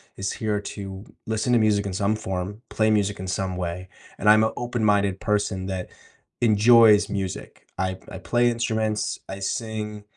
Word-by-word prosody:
is 95 Hz, 0 st, -3 dB
here 105 Hz, -2 st, -1 dB
to 100 Hz, 0 st, -7 dB, 0.2 s
listen 110 Hz, +2 st, 0 dB
to 120 Hz, -, +5 dB
music 105 Hz, -2 st, +2 dB
in 95 Hz, -, -4 dB
some 100 Hz, +3 st, +1 dB
form, 95 Hz, +1 st, -4 dB
play 110 Hz, 0 st, +1 dB
music 105 Hz, -1 st, +1 dB
in 95 Hz, -, -5 dB
some 95 Hz, 0 st, -2 dB
way, 90 Hz, +1 st, -4 dB, 0.3 s
and 105 Hz, -, +3 dB
I'm 110 Hz, +1 st, +7 dB
a 110 Hz, -, 0 dB
open-minded 105 Hz, -5 st, +1 dB
person 100 Hz, -3 st, -1 dB
that 95 Hz, -1 st, -4 dB, 0.5 s
enjoys 110 Hz, -2 st, +6 dB
music." 95 Hz, -3 st, -5 dB, 0.2 s
I 95 Hz, 0 st, -1 dB
I 95 Hz, -, -7 dB
play 120 Hz, +4 st, +2 dB
instruments, 110 Hz, -2 st, -1 dB
I 95 Hz, +1 st, -6 dB
sing 105 Hz, 0 st, -4 dB
105 Hz, 165 wpm, -24 LUFS, 95-110 Hz, 0.5 s, I'm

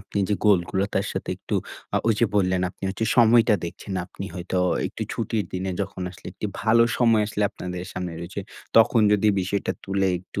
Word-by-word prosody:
আপনি 100 Hz, +1 st, -5 dB
যে 105 Hz, -, +2 dB
গোলগুলা 95 Hz, -1 st, +3 dB
তার 95 Hz, -, +1 dB
সাথে -, -, -5 dB
একটু -, -, -5 dB, 0.4 s
আ -, -, +4 dB
ঐ -, -, +4 dB
যে 115 Hz, -, +4 dB
বললেন 90 Hz, -2 st, +2 dB
আপনি -, -, -30 dB
হচ্ছে 95 Hz, +4 st, -2 dB
সময়টা 115 Hz, -1 st, +6 dB
দেখছেন। 85 Hz, +4 st, -7 dB
আপনি 100 Hz, -, -8 dB
হয়তো 90 Hz, +1 st, -2 dB, 0.3 s
একটু -, -, -5 dB
ছুটির 110 Hz, -4 st, -1 dB
দিনে 95 Hz, +1 st, -2 dB
যখন 100 Hz, -1 st, -4 dB
আসলে 90 Hz, -, -13 dB
একটি 105 Hz, -, -4 dB
ভালো 115 Hz, +1 st, +5 dB
সময় 115 Hz, -3 st, +4 dB
আসলে 105 Hz, 0 st, -2 dB
আপনাদের 90 Hz, -2 st, -6 dB
সামনে 90 Hz, -2 st, -4 dB
রয়েছে, 90 Hz, +4 st, -5 dB, 0.4 s
তখন 115 Hz, +1 st, +6 dB
যদি 105 Hz, +1 st, +3 dB
বিষয়টা 100 Hz, +2 st, -1 dB
তুলে 95 Hz, 0 st, 0 dB
একটু 95 Hz, +2 st, -7 dB
100 Hz, 190 wpm, -24 LUFS, 95-110 Hz, 0.4 s, সময়টা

